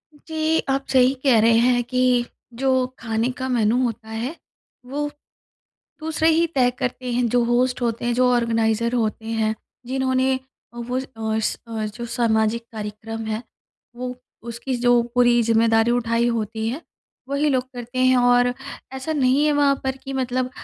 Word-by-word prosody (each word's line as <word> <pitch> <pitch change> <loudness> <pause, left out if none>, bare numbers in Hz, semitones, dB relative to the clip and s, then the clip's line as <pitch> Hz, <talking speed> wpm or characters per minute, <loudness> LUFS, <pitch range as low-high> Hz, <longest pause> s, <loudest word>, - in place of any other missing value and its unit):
जी, 315 +1 -1
आप 270 0 0
सही 260 0 +4
कह 250 -5 +5
रहे 225 0 +5
हैं 245 0 +3
कि 250 0 +2 0.4
जो 270 - +2 0.3
खाने 225 +1 -1
का 260 - -3
मेन्यू 230 -1 +2
होता 225 -2 -3
है 235 +8 -4 0.5
वो 290 +3 -3 0.9
दूसरे 320 +1 +1
ही 330 +1 +3
तय 250 -2 +4
करते 250 0 -3
हैं 245 0 +1
जो 245 0 +2
होस्ट 250 +1 +1
होते 235 0 -1
हैं, 240 - +1
जो 250 +1 +3
ऑर्गेनाइज़र 230 0 +1
होते 220 -1 -1
हैं, 220 -1 0 0.3
जिन्होंने 260 0 +1 0.4
वो 245 +2 -3
अ, 220 -4 -3
स 220 - -1 0.4
जो 235 -1 -5
सामाजिक 230 -1 +1
कार्यक्रम 220 +1 -6
है 220 +2 -3 0.5
वो 250 0 -5 0.3
उसकी 245 +3 -3
जो 245 0 +4
पूरी 240 -1 +5
ज़िम्मेदारी 225 0 +3
उठाई 235 0 +1
होती 220 -1 -2
है 280 +8 -4 0.5
वही 285 +2 +1
लोग 255 -2 +1
करते 245 +1 -6
हैं। 255 0 +5
और 245 0 +4 0.4
ऐसा 265 +4 -3
नहीं 275 +1 +3
है 300 - +3
वहाँ 285 -1 +3
पर 265 0 -2
कि 270 - -6
मतलब 255 -1 -1
245 Hz, 160 wpm, -22 LUFS, 230-260 Hz, 0.9 s, कह